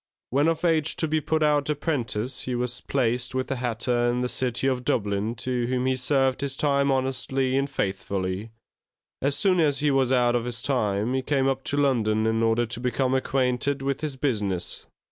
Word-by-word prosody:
When 140 Hz, +5 st, +2 dB
of 165 Hz, +1 st, 0 dB
age 160 Hz, -2 st, +2 dB
to 160 Hz, -, +1 dB
be 155 Hz, 0 st, 0 dB
put 155 Hz, +1 st, 0 dB
out 150 Hz, -1 st, +2 dB
apprentice, 130 Hz, -6 st, -2 dB
he 125 Hz, -, -2 dB
was 125 Hz, 0 st, -3 dB
placed 125 Hz, -1 st, 0 dB
with 130 Hz, +1 st, -2 dB
a 135 Hz, -, -1 dB
hatter 120 Hz, 0 st, 0 dB
in 120 Hz, +1 st, 0 dB
the 125 Hz, -, 0 dB
city 125 Hz, 0 st, -1 dB
of 130 Hz, -2 st, 0 dB
Dublin, 105 Hz, 0 st, -1 dB
to 125 Hz, -2 st, -2 dB
whom 125 Hz, 0 st, -1 dB
he 130 Hz, 0 st, +2 dB
served 130 Hz, 0 st, +1 dB
his 140 Hz, -1 st, 0 dB
time 140 Hz, -1 st, +2 dB
honestly 130 Hz, 0 st, 0 dB
and 140 Hz, +1 st, 0 dB
faithfully; 95 Hz, -2 st, -3 dB, 0.7 s
as 140 Hz, +1 st, +1 dB
soon 185 Hz, -3 st, +3 dB
as 145 Hz, -3 st, +2 dB
he 150 Hz, -1 st, +2 dB
was 135 Hz, -2 st, +2 dB
out 120 Hz, -2 st, +3 dB
of 120 Hz, -1 st, 0 dB
his 120 Hz, -1 st, -4 dB
time, 110 Hz, -4 st, 0 dB
he 130 Hz, -, 0 dB
came 135 Hz, 0 st, +1 dB
up 135 Hz, 0 st, -1 dB
to 145 Hz, -, 0 dB
London 110 Hz, -6 st, +2 dB
in 110 Hz, 0 st, +1 dB
order 115 Hz, +1 st, +2 dB
to 120 Hz, +1 st, -3 dB
become 125 Hz, +1 st, 0 dB
acquainted 130 Hz, +1 st, 0 dB
with 140 Hz, +1 st, -2 dB
his 150 Hz, -3 st, -3 dB
business. 105 Hz, -10 st, -2 dB
130 Hz, 200 wpm, -25 LUFS, 120-140 Hz, 0.7 s, soon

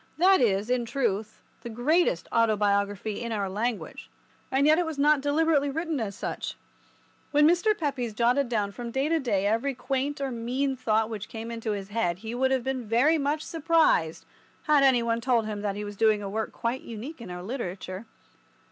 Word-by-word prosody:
That 375 Hz, 0 st, +5 dB
is, 210 Hz, 0 st, +1 dB
in 250 Hz, -1 st, +1 dB
truth, 220 Hz, -4 st, -2 dB, 0.2 s
the 235 Hz, -, -7 dB
greatest 245 Hz, -, +1 dB
autobiography 205 Hz, -1 st, +1 dB
in 235 Hz, -1 st, -4 dB
our 205 Hz, -3 st, -1 dB
language, 215 Hz, +4 st, -4 dB, 0.4 s
and 270 Hz, +2 st, +2 dB
yet 310 Hz, +2 st, +5 dB
it 355 Hz, -, +1 dB
was 320 Hz, -3 st, -5 dB
not 295 Hz, 0 st, +4 dB
deliberately 290 Hz, 0 st, +2 dB
written 320 Hz, +1 st, -2 dB
as 205 Hz, -4 st, -3 dB
such. -, -, -4 dB, 0.7 s
When 295 Hz, +1 st, +5 dB
Mr. 355 Hz, +6 st, +3 dB
Pepys 270 Hz, -7 st, -2 dB
jotted 245 Hz, +3 st, +2 dB
down 210 Hz, -4 st, 0 dB
from 240 Hz, +3 st, -6 dB
day 270 Hz, +5 st, -1 dB
to 330 Hz, 0 st, +2 dB
day 205 Hz, -8 st, 0 dB
every 230 Hz, +6 st, 0 dB
quaint 275 Hz, +3 st, -2 dB
or 275 Hz, -1 st, -2 dB
mean 255 Hz, +4 st, -1 dB
thought 220 Hz, -3 st, +1 dB
which 215 Hz, -2 st, -6 dB
came 225 Hz, +1 st, -6 dB
into 230 Hz, -2 st, -3 dB
his 195 Hz, -1 st, -6 dB
head 205 Hz, -6 st, -1 dB
he 220 Hz, -, -4 dB
would 260 Hz, +2 st, +1 dB
have 265 Hz, -2 st, +1 dB
been 260 Hz, -3 st, -3 dB
very 270 Hz, +9 st, +3 dB
much 295 Hz, +2 st, -1 dB
surprised 320 Hz, -, +1 dB, 0.4 s
had 300 Hz, -2 st, +4 dB
any 255 Hz, -3 st, +4 dB
one 230 Hz, 0 st, 0 dB
told 235 Hz, -2 st, +2 dB
him 210 Hz, -1 st, -4 dB
that 205 Hz, -1 st, -2 dB
he 210 Hz, 0 st, -4 dB
was 205 Hz, 0 st, -7 dB
doing 215 Hz, -1 st, +2 dB
a -, -, -4 dB
work 220 Hz, +1 st, -2 dB
quite 235 Hz, +3 st, -3 dB
unique 235 Hz, +6 st, -8 dB
in 230 Hz, -, -8 dB
our 180 Hz, 0 st, -6 dB
literature. 190 Hz, -3 st, -5 dB
235 Hz, 195 wpm, -27 LUFS, 215-280 Hz, 0.7 s, That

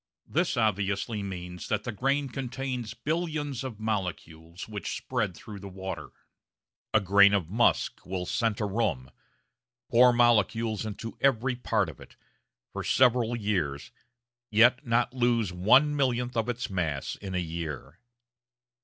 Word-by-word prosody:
This 170 Hz, -3 st, 0 dB
obviously 105 Hz, 0 st, 0 dB
means 90 Hz, -2 st, -6 dB
that 105 Hz, -1 st, -1 dB
the 120 Hz, -, -3 dB
grain 135 Hz, +6 st, 0 dB
contains 125 Hz, -3 st, -4 dB
billions 150 Hz, -1 st, -2 dB
of 120 Hz, -5 st, -6 dB
molecules 90 Hz, -5 st, -4 dB
which 105 Hz, -2 st, -4 dB
spread 85 Hz, -, -2 dB
through 105 Hz, +2 st, -9 dB
the 100 Hz, 0 st, -8 dB
water. 95 Hz, -4 st, -6 dB, 0.8 s
A 110 Hz, -, +5 dB
grain 100 Hz, 0 st, +5 dB
of 90 Hz, -4 st, -2 dB
musk 115 Hz, +3 st, +1 dB
will 90 Hz, -1 st, -4 dB
scent 115 Hz, +2 st, 0 dB
a 105 Hz, -, 0 dB
room 95 Hz, -, -1 dB, 0.8 s
pour 125 Hz, +1 st, +7 dB
molecules 115 Hz, -2 st, +2 dB
into 115 Hz, +2 st, -6 dB
every 130 Hz, -2 st, +2 dB
part 110 Hz, -5 st, 0 dB
of 80 Hz, -, -10 dB
it -, -, -14 dB, 0.6 s
for -, -, -4 dB
several 120 Hz, -2 st, +3 dB
years, 90 Hz, -11 st, -2 dB, 0.6 s
yet 120 Hz, +5 st, +5 dB
not 120 Hz, +1 st, +2 dB
lose 120 Hz, -6 st, +1 dB
one 130 Hz, +11 st, +4 dB
millionth 125 Hz, -3 st, 0 dB
of 115 Hz, +1 st, 0 dB
its 120 Hz, 0 st, -2 dB
mass 80 Hz, -8 st, -2 dB
in 95 Hz, -2 st, -6 dB
a -, -, +1 dB
year. 80 Hz, -3 st, -5 dB
110 Hz, 140 wpm, -28 LUFS, 95-125 Hz, 0.8 s, pour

